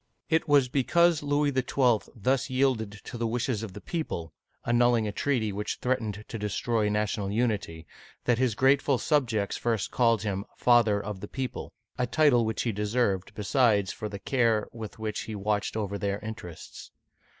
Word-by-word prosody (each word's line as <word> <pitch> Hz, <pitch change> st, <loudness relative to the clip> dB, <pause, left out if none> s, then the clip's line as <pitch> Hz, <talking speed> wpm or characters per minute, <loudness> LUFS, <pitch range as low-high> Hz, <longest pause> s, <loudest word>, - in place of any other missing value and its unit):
It 160 Hz, -, +2 dB
was 145 Hz, -3 st, +5 dB
because 165 Hz, +6 st, +3 dB
Louis 145 Hz, 0 st, +1 dB
XII. 125 Hz, -3 st, +1 dB
thus 125 Hz, +5 st, 0 dB
yielded 130 Hz, -5 st, +1 dB
to 120 Hz, -, -8 dB
the 115 Hz, -, 0 dB
wishes 120 Hz, -1 st, -1 dB
of 110 Hz, -4 st, -6 dB
the -, -, -9 dB
people 85 Hz, -, -4 dB, 0.2 s
— -, -, -39 dB
annulling 120 Hz, -2 st, +3 dB
a -, -, -2 dB
treaty 115 Hz, -2 st, 0 dB
which 105 Hz, +1 st, -3 dB
threatened 110 Hz, -5 st, -2 dB
to 115 Hz, -, -6 dB
destroy 105 Hz, +1 st, 0 dB
national 105 Hz, -1 st, -1 dB
unity 105 Hz, -8 st, -1 dB, 0.2 s
— -, -, -26 dB
that 120 Hz, -1 st, +2 dB
his 125 Hz, -5 st, +1 dB
grateful 135 Hz, +2 st, +3 dB
subjects 115 Hz, -9 st, 0 dB
first 115 Hz, -4 st, -1 dB
called 115 Hz, -4 st, +2 dB
him 100 Hz, -1 st, -2 dB
" -, -, -32 dB
Father 115 Hz, -4 st, +4 dB
of 100 Hz, -1 st, -6 dB
the 105 Hz, -, -7 dB
People/' 130 Hz, +1 st, -5 dB, 0.3 s
a 125 Hz, -, +1 dB
title 140 Hz, -7 st, +4 dB
which 110 Hz, 0 st, -1 dB
he 120 Hz, -, 0 dB
deserved, 105 Hz, -2 st, -1 dB
besides, 105 Hz, -3 st, +2 dB
for 105 Hz, -, -5 dB
the 100 Hz, -, -6 dB
care 115 Hz, -1 st, +1 dB
with 110 Hz, -3 st, -8 dB
which 110 Hz, -1 st, -4 dB
he 110 Hz, -, -5 dB
watched 105 Hz, +1 st, -1 dB
over 100 Hz, -2 st, -3 dB
their 100 Hz, -1 st, -1 dB
interests. 105 Hz, -7 st, -9 dB
115 Hz, 180 wpm, -28 LUFS, 105-125 Hz, 0.3 s, was